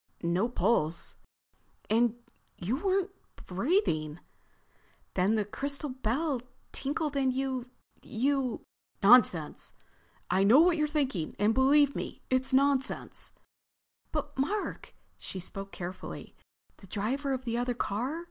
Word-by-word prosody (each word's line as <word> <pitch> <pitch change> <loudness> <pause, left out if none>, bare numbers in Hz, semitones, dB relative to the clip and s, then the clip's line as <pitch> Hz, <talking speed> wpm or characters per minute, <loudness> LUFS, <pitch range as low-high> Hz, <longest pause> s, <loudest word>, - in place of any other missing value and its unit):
"No 175 +7 +1
pulse?" 175 -8 +1 0.7
"And 230 +1 +3 0.4
you 205 +9 -1
weren't—breathing. 340 - -1 0.9
Then 195 +4 +2
the 210 -2 +1
crystal 280 +6 -3
bell 260 +3 -1 0.3
tinkled 290 +1 -2
and 265 -2 +2
you—you...." 255 0 -2 0.4
"Nonsense! 195 -8 +5 0.5
I 185 +2 +2
know 225 +8 +7
what 340 +1 +5
you're 300 -1 +2
thinking 275 - -1
and 210 +3 +3
believe 280 +3 +4
me—it's 260 +1 -1
nonsense!" 275 0 +1 0.8
"But - - -3
Mark." 400 +10 -2 0.2
She 190 - -5
spoke 195 +2 -5
carefully. 180 +1 -7 0.4
"The 195 - -15
driver 255 +9 -1
of 260 -1 -2
the 235 0 -1
other 245 0 -1
car. 245 +9 -2
255 Hz, 110 wpm, -30 LUFS, 200-280 Hz, 0.9 s, know